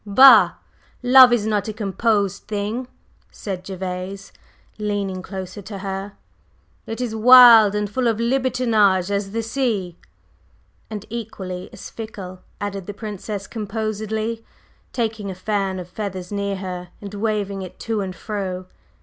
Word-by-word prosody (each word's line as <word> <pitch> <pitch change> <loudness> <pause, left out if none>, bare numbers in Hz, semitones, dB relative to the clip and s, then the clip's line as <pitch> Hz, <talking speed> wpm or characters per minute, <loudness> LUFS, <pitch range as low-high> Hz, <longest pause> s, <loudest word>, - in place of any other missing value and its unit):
"Bah! 260 +7 +7 0.5
Love 255 0 +8
is 235 -3 +2
not 210 -1 0
a 215 - -3
composed 205 -1 0
thing," 215 +4 -3 0.4
said 190 -3 -6
Gervase, 190 +1 -5 0.5
leaning 200 -3 -2
closer 190 +1 -7
to 200 +1 -8
her. 195 +1 -5 0.7
"It 225 - -5
is 240 -3 -2
wild, 230 -3 +8
and 210 0 0
full 245 +4 -1
of 225 -2 +1
libertinage 230 -6 +2
as 200 -1 -1
the 225 +3 -3
sea." 220 -8 -2 0.9
"And 215 -1 -6
equally 195 -6 -6
as - - -10
fickle," 195 -5 -8 0.2
added 200 -2 -5
the 205 - -6
Princess 205 -1 -6
composedly, 220 +1 -3 0.5
taking 220 -4 -2
a 190 - -5
fan 195 0 -1
of 180 -2 -6
feathers 185 -1 -6
near 200 -1 -2
her 180 -2 -6
and 200 -1 -9
waving 205 -2 -2
it 185 -1 -9
to 225 -2 -1
and 185 -2 -5
fro. 185 -2 -4
205 Hz, 140 wpm, -22 LUFS, 190-225 Hz, 0.9 s, Love